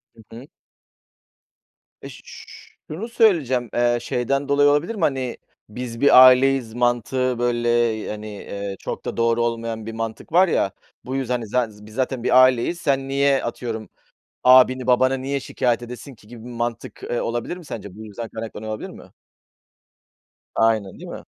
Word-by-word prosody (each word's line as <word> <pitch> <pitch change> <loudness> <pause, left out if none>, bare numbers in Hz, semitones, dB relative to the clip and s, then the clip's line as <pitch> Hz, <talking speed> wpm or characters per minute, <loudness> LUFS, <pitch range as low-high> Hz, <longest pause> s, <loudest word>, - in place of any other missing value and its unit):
Hı 115 - -16
hı. 120 +4 -11 1.6
Eee, - - -7
ş - - -12
ş 450 - -11 0.5
şunu 185 +9 -5
söyleyeceğim, 155 - +2
eee, 120 0 +2
şeyden 135 +3 -1
dolayı 145 0 +4
olabilir 145 +10 +1
mi, 205 - -6
hani, 130 -3 -1 0.3
biz 115 +2 -7
bir 135 -2 +8
aileyiz 130 -2 +4
mantığı, 120 +1 0
böyle, 120 -1 0 0.4
hani, 105 0 -6
eee, 100 -1 -6
çok - - -6
da - - -4
doğru 115 0 +2
olmayan 115 -1 -3
bir 115 - -6
mantık 115 +3 -6
var 180 +4 +5
ya. 100 - +1 0.3
Bu 130 - -4
yüzden, 130 -2 -1
hani, 120 -3 -3
"Za 125 +2 0 0.2
biz 105 0 -14
zaten 130 -1 -2
bir 130 +1 +6
aileyiz. 130 +7 +2
Sen 135 -1 0
niye 140 0 +2
atıyorum 115 -2 -5 0.5
abini, 130 0 +5
babanı 130 +1 +3
niye 140 +1 -2
şikâyet 120 -2 -1
edesin 125 +3 -9
ki?" 105 - -21
gibi 115 0 -12
bir - - -8
mantık, 120 -1 -5
eee, 120 - -2
olabilir 120 +9 -3
mi 175 - -13
sence? 100 -8 -8
Bu 110 +1 -10
yüzden 110 +2 -7
kaynaklanıyor 110 -1 -7
olabilir 110 - -6
mi? - - -14 1.4
Aynen, 110 -4 +1
değil - - -9
mi? - - -8
120 Hz, 170 wpm, -22 LUFS, 115-135 Hz, 1.6 s, bir